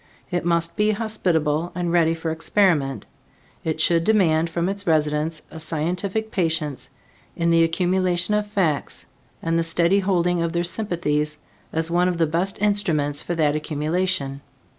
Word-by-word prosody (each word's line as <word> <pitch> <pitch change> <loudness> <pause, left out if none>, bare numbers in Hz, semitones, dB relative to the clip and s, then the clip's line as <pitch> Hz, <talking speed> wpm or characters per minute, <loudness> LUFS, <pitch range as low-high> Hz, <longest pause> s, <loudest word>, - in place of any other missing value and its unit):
It 175 - -1
must 170 0 +1
be 210 0 +3
hospitable 175 -7 0
and 175 -1 -1
ready 165 -1 +3
for 165 0 -3
experiment. 160 - +1 0.6
It 160 -1 -2
should 165 +1 +3
demand 170 -6 +3
from 170 +1 -1
its 200 0 -4
residents 155 0 +1
a 160 - -8
scientific 180 +7 -2
patience 160 - -1 0.5
in 170 0 +1
the 165 0 +5
accumulation 180 +3 +1
of 210 0 +1
facts 180 -8 -1 0.4
and 165 0 +1
the - - +1
steady 170 +3 +2
holding 180 -3 +1
of 170 0 -1
their 170 0 0
sympathies 165 -6 -1 0.3
as 160 +1 -2
one 175 +1 +3
of 180 -2 -1
the 165 - +3
best 170 +5 -1
instruments 160 -9 +1
for 175 - -3
that 150 -2 +2
accumulation. 155 -1 -1
170 Hz, 155 wpm, -23 LUFS, 160-185 Hz, 0.6 s, the